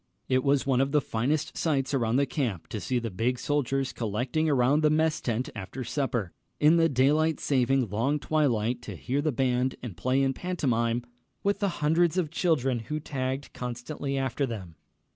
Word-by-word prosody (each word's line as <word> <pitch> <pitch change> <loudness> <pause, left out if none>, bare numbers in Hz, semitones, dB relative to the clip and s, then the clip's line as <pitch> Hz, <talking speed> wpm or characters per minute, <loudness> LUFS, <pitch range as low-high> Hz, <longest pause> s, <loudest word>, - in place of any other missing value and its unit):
It 130 0 +2
was 140 -1 +2
one 130 -2 +3
of 135 +1 0
the 150 - +5
finest 135 +4 -1
sights 140 -4 0
around 115 -3 +1
the 140 +2 +3
camp 125 - -2
to 110 - -4
see 115 +7 -1
the 115 -2 -2
big 120 +7 0
soldiers 135 -1 -1
collecting 125 +8 -1
around 140 +2 +3
the 155 - +4
mess 155 +1 +2
tent 120 +1 -2
after 110 +5 -6
supper, 120 -6 -2 0.3
in 155 +3 +5
the 165 0 +4
daylight 150 +4 +2
saving 135 -2 +2
long 115 +9 0
twilight, 125 -6 0
to - - -7
hear 135 +3 -1
the 155 +1 +1
band 130 0 +1
and 115 -8 -6
play 130 +8 +1
in 135 0 +1
pantomime 120 -9 0 0.4
with 200 0 +1
the 200 - +1 0.2
hundreds 170 +3 +3
of 165 -5 0
children 140 -8 +1
who 150 +7 -4
tagged 135 -1 -4
constantly 125 +3 -4
after 135 +1 -1
them. 95 -8 -6
135 Hz, 180 wpm, -28 LUFS, 120-150 Hz, 0.4 s, the